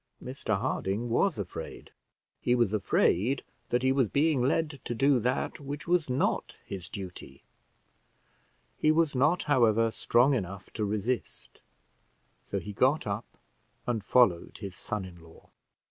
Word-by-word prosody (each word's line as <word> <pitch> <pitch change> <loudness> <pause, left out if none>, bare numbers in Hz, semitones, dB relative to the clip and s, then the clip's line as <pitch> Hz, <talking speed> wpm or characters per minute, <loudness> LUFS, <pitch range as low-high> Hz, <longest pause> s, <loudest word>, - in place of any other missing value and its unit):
Mr 125 -5 -3
Harding 115 -1 -2
was 185 +8 +2
afraid; 100 -4 -7 0.5
he 120 - +2
was 120 -4 +2
afraid 110 +4 +2 0.3
that 120 +1 +1
he 130 - +4
was 135 -3 +3
being 145 +2 +2
led 150 +5 +1
to 120 - -3
do 135 +1 +4
that 125 +7 -1
which 145 +2 -6
was 175 -5 +2
not 125 - 0
his 95 -2 -7
duty; 90 -9 -8 1.4
he 155 - +4
was 160 -1 +2
not, 150 +7 +2
however, 115 -5 +3
strong 125 +5 +3
enough 100 -5 -4
to 105 - -1
resist, 110 +4 -3 0.9
so - - -1
he 105 - -5
got 130 +8 +2
up 105 +2 -5 0.5
and 115 -4 -1
followed 105 -8 +3
his 100 -4 -7
son 105 -4 -4
in 90 -2 -12
law. 80 0 -18
120 Hz, 145 wpm, -29 LUFS, 100-135 Hz, 1.4 s, he